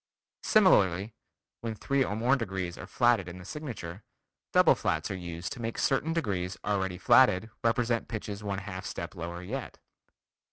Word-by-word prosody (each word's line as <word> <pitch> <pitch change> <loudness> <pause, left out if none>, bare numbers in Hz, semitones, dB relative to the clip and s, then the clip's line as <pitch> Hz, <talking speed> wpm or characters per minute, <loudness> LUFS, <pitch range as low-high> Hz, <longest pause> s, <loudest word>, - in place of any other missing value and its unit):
Similarly, 105 - +4 0.5
when 115 -1 -4
three 140 +5 +1
or 105 - -2
more 120 +5 +3
degrees 95 -8 -3
are 90 - -9
flatted 120 -5 +3
in 85 - -8
the 90 - -11
signature, 110 - -6 0.5
double - - +6
flats - - -1
are - - -2
used 85 -1 -5
to 120 - -9
make 115 0 -3
certain 145 +4 +1
degrees 100 - -1
already 95 -3 0
flatted, 110 +1 +5
represent 115 0 +1
pitches 105 -2 -5
one 100 -1 -2
half 95 -1 -6
step 85 +1 -5
lower 85 0 -6
yet. 125 +7 -5
100 Hz, 160 wpm, -29 LUFS, 90-120 Hz, 0.5 s, double